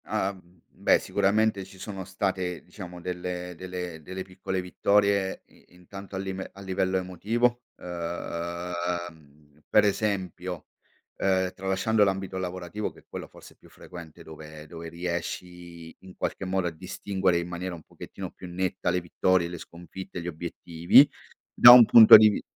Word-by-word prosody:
Ah, 100 +1 -1
mhmm, 90 -2 -21
beh - - +2
sicuramente 100 0 +1
ci 95 +1 -15
sono 95 -1 -7
state, 95 -2 -3
diciamo, 90 -1 -10
delle 90 0 -5
delle 90 -2 -7
delle 95 +4 -7
piccole 95 0 -5
vittorie 100 +1 +1
i - - -24
intanto 95 +2 -11
a - - -3
lime 95 0 -5
a 100 - -12
livello 95 -1 -1
emotivo, 115 +7 -1 0.2
ehm, 85 -3 -6
per 105 - +5
esempio, 95 -4 -2 0.5
ehm, 95 -1 0
tralasciando 95 +3 +1
l'ambito 95 -1 -1
lavorativo 90 +2 -5
che - - -18
è - - -38
quello - - -7
forse - - -16
più - - -21
frequente 85 -3 -12
dove 80 -1 -11
dove 85 +1 -9
riesci 85 0 -6
in 95 -1 -14
qualche 95 - -3
modo 95 0 -1
a - - -3
distinguere 95 +2 -2
in 85 0 -3
maniera 90 +1 -5
un 80 - -13
pochettino - - -9
più 90 - -11
netta 90 0 -2
le 90 +1 0
vittorie, 85 +1 +1
le 90 -1 -7
sconfitte, 90 +2 -9
gli 85 - -7
obiettivi, 85 - +3 0.5
da 120 - +10
un 125 -1 +10
punto 110 -2 +10
di 110 0 +7
vi 105 - -3
90 Hz, 155 wpm, -26 LUFS, 85-95 Hz, 0.5 s, da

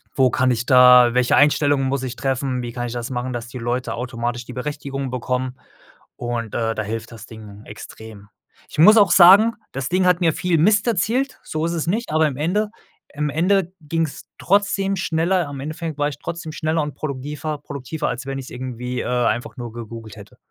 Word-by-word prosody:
wo 130 -2 +4
kann 130 0 +2
ich 120 0 -1
da 125 -1 +7
welche 125 -1 +3
Einstellungen 145 -2 +3
muss 135 0 -1
ich 125 -2 -4
treffen? 130 -1 -2
Wie 120 -1 -6
kann 120 -1 -3
ich 115 - -6
das 120 -1 -4
machen, 125 0 -3
dass 120 -1 -5
die 125 +1 -8
Leute 120 0 -2
automatisch 120 0 -4
die 125 - -9
Berechtigung 135 0 -4
bekommen" 125 +1 -3 0.6
und, 120 -2 -4
äh, 115 -1 -1
da 110 - -2
hilft 115 +2 -5
das 110 -1 -10
Ding 110 -3 -12
extrem. 110 -2 -11 0.4
Ich - - -11
muss 210 +7 +8
auch 205 -2 +6
sagen, 195 +6 +7 0.2
das 130 -1 -3
Ding 185 +1 +2
hat 180 0 +3
mir 165 -3 +3
viel 180 0 0
Mist 205 +6 +3
erzählt, 235 +6 0
so 155 +1 -3
ist 170 - -1
es 165 -1 -3
nicht, 220 0 -1
aber 155 0 +3
im 140 -3 -5
Ende 200 +8 0 0.4
im 150 0 -2
Ende 180 +4 +1
ging's 160 0 -3
trotzdem 195 0 +1
schneller. 170 -1 0
Im 140 - -7
Endeffekt 155 +2 -5
war 145 0 +1
ich 145 - -8
trotzdem 165 0 -6
schneller 155 +1 -1
und 150 -1 -4
produkdiver 150 +2 -4
produktiver, 145 +1 -5
als 125 +1 -5
wenn 135 0 -4
ich 135 - -7
es - - -10
irgendwie, 125 0 -5
äh, - - -5
einfach 120 +1 -1
nur 120 -2 -7
gegoogelt 115 -1 -9
hätte. 100 -2 -14
135 Hz, 205 wpm, -21 LUFS, 120-160 Hz, 0.6 s, muss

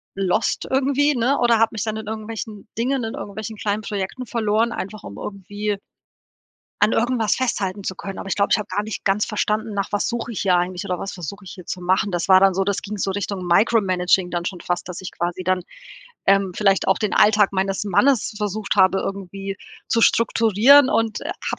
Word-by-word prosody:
lost 195 +2 0
irgendwie, 280 +2 +2
ne, 250 +4 +2
oder 235 -2 +3
hab 225 - +3
mich 220 -4 -3
dann 220 -1 -3
in 220 -1 -7
irgendwelchen 220 -1 -6
Dingen 255 +2 0
in 225 - -4
irgendwelchen 215 +2 -7
kleinen 205 +1 -1
Projekten 205 +4 -4
verloren, 225 0 0
einfach 205 -1 -6
um 100 - -9
irgendwie 205 +1 -4 1.0
an 210 +2 +4
irgendwas 230 -2 +1
festhalten 200 -6 -2
zu 190 - -3
können. 195 +1 -7
Aber - - -6
ich - - 0
glaube, 200 - +1
ich - - +5
habe 210 - -4
gar 200 +3 -1
nicht 215 +1 -6
ganz 200 +2 +2
verstanden, 215 0 -1
nach 200 0 -2
was 205 - 0
suche 235 0 -3
ich 215 - -4
hier 185 -3 +3
eigentlich, 180 +2 -2
oder 180 -2 -2
was 195 - -5
versuche 195 +2 -7
ich 185 - -9
hier 180 - -11
zu 185 - -5
machen. 185 +3 +1
Das 175 -1 -2
war 185 -1 +7
dann 195 -1 +4
so 195 +1 +1
das 200 0 -1
ging 210 +1 -6
so 195 - -1
Richtung 195 -1 -4
Micro 220 +6 +4
Managing 185 -1 +1
dann 175 0 -2
schon 180 0 -4
fast, 175 0 -3
dass 180 - -6
ich 190 - -7
quasi 175 +1 -3
dann, 185 0 +1 0.6
ähm, 195 -1 +3
vielleicht 195 -1 +2
auch 190 - +3
den 215 - -1
Alltag 210 -1 +5
meines 195 +1 -1
Mannes 225 +4 +2
versucht 210 0 -2
habe, 190 0 +5
irgendwie 195 0 -5 0.3
zu 230 - +2
strukturieren 230 +5 +5
und 225 -2 +1
habe - - -5
205 Hz, 210 wpm, -22 LUFS, 190-220 Hz, 1.0 s, war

